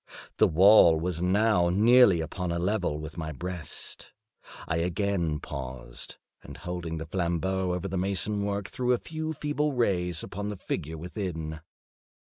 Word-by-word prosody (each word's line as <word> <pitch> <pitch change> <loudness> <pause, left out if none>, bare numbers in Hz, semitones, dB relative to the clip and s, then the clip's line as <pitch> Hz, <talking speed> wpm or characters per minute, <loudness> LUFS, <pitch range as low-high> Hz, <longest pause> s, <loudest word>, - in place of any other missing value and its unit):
The - - +5
wall 85 -2 +7
was 85 0 -2
now 95 -1 +3
nearly 105 -1 +6
upon 85 +3 -3
a 85 - -1
level 90 -3 0
with 75 +2 -7
my 80 -1 -4
breast. 90 +2 -7 0.6
I 80 - 0
again 85 -2 0
paused, 65 -2 -7 0.2
and - - -11
holding 90 -2 -5
the 80 - -5
flambeaux 90 +2 -1
over 90 +2 -2
the 95 -1 -2
mason 100 +2 0
work, 100 -1 -2
threw 125 0 0
a - - +2
few 160 +4 -5
feeble 150 -1 -1
rays 90 - 0
upon 100 +1 -5
the 105 - -5
figure 80 -3 -4
within. 80 -3 -5
90 Hz, 150 wpm, -28 LUFS, 80-100 Hz, 0.6 s, wall